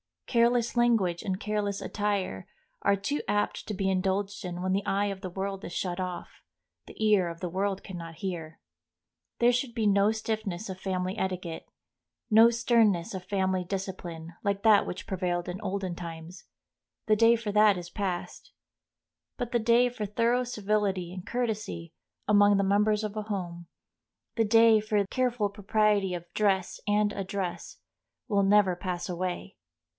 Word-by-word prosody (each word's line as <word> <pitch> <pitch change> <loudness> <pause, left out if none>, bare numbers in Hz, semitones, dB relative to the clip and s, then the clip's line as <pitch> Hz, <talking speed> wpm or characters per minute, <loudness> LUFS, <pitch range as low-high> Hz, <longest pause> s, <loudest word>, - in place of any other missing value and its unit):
Careless 235 0 +2
language 220 -8 +2
and 190 -2 -2
careless 210 -2 -2
attire 200 - -2 0.3
are 200 - +3
too 205 +10 -2
apt 205 0 -1
to 215 - -3
be 195 -1 -1
indulged 195 +2 -1
in 175 0 -5
when 185 +1 -1
the 195 +1 0
eye 200 +1 +1
of 195 -1 -4
the 190 -1 -6
world 195 +2 -4
is 175 - -7
shut 180 0 -2
off, 180 -1 -6 0.5
the - - -12
ear 205 -4 +4
of 170 0 -7
the 180 - -2
world 195 +2 -2
can 185 - -7
not 165 -1 -8
hear. 165 -3 -5 0.8
There 240 +1 +5
should 245 -1 -2
be 225 -2 0
no 200 +1 +4
stiffness 215 -3 -3
of 185 -1 -6
family 185 +1 -2
etiquette, 185 -3 -3 0.6
no 225 +2 +8
sternness 230 -7 +2
of 185 -1 -6
family 190 -2 0
discipline, 175 -3 -5
like 200 -1 -1
that 220 -2 +5
which 185 +3 -5
prevailed 180 -2 -2
in 180 +1 -5
olden 190 -2 -3
times—the 170 +5 -6
day 230 +2 +5
for 225 -2 -3
that 210 -1 +5
is 175 -1 -7
passed. 185 -3 -4 0.8
But 245 -1 -3
the 240 - +2
day 235 +2 +4
for 225 -3 -4
thorough 235 +4 +1
civility 205 -6 -1
and 185 +1 -8
courtesy 215 -9 -3 0.3
among 205 0 +5
the 200 - +2
members 210 +2 +2
of 215 0 -4
a 215 - -2
home, 175 -5 -5 0.7
the 225 - +3
day 225 0 +6
for 210 -1 0
careful 245 -3 0
propriety 205 -1 +1
of 175 0 -9
dress 195 -4 +1
and 205 0 +2
address, 195 -2 -4 0.5
will 200 -2 +3
never 195 -2 +4
pass 180 -1 -4
away. 175 - -4
200 Hz, 160 wpm, -28 LUFS, 185-215 Hz, 0.8 s, no